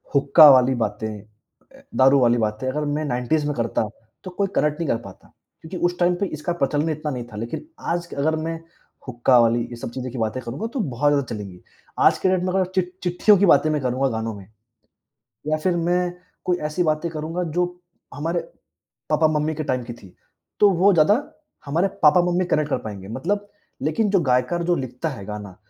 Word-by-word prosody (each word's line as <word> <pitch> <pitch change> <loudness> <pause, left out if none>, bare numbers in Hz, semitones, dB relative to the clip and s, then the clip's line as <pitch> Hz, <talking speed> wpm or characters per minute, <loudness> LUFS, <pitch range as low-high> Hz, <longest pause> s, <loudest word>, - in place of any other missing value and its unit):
हुक्का 150 +2 +8
वाली 130 0 +4
बातें, 110 -2 -2
ए, 105 +1 -21
दारू 135 +1 +5
वाली 120 -1 +3
बातें 110 +2 -2
अगर 150 +3 -2
मैं 155 +1 -2
90s 140 +3 0
में 145 - -1
करता, 115 -2 -1 0.4
तो 185 - -6
कोई 200 +2 -1
कनेक्ट 150 +1 +1
नहीं 165 -4 -2
कर - - +2
पाता। 95 - -14 0.3
क्योंकि 160 +3 -7
उस 175 0 -5
टाइम 175 0 +3
पे 200 - +1
इसका 170 +4 -2
प्रचलन 150 0 0
इतना 155 -1 -3
नहीं 125 -3 -4
था। - - -8
लेकिन 115 - -5 0.2
आज 170 0 -1
क - - -7
अगर 160 +3 +1
मैं 165 +1 -4 0.5
हुक्का 125 0 +3
वाली 115 0 +3
ये 120 - -7
सब 120 0 -7
चीज़ें 130 0 -5
की 125 - -7
बातें 110 +3 -2
करूँगा, 130 - -4
तो 255 - -5
बहुत 145 - +1
ज़्यादा 140 -2 +1
चलेंगी। 95 -4 -9 0.4
आज - - +5
की 185 - +1
डेट 185 -1 +1
में 185 0 -1
अगर 190 -1 +2
चिट 180 -1 0
चिट्ठियों 180 +4 +4
की 200 - +3
बातें 155 -3 +5
मैं 150 -2 0
करूँगा 130 +2 0
गानों 110 0 -3
में 95 -2 -12 1.0
या 155 0 +1
फिर 175 +3 0
मैं 175 +1 0 0.3
कोई 180 -1 +1
ऐसी 175 +4 0
बातें 155 +1 0
करूँगा 160 +3 -3
जो 180 - +3 0.5
हमारे 165 +4 -2 0.7
पापा-मम्मी 155 0 +2
के 155 - -3
टाइम 130 -3 -1
की 120 0 -7
थी, 95 -6 -16 0.4
तो 205 - +7
वो 190 +3 +4
ज़्यादा 170 +5 +5 0.5
हमारे 165 +7 +1 0.2
पापा-मम्मी 175 +3 +4
कनेक्ट 150 -4 0
कर - - +1
पाएँगे। 100 -3 -8
मतलब 205 - -2 0.3
लेकिन 160 +9 0
जो 195 -1 +3
गीतकार 130 +5 +1
जो 175 +1 +2
लिखता 130 +3 -4
है 115 -9 -8
गाना, 105 -2 -7
150 Hz, 205 wpm, -22 LUFS, 125-175 Hz, 1.0 s, हुक्का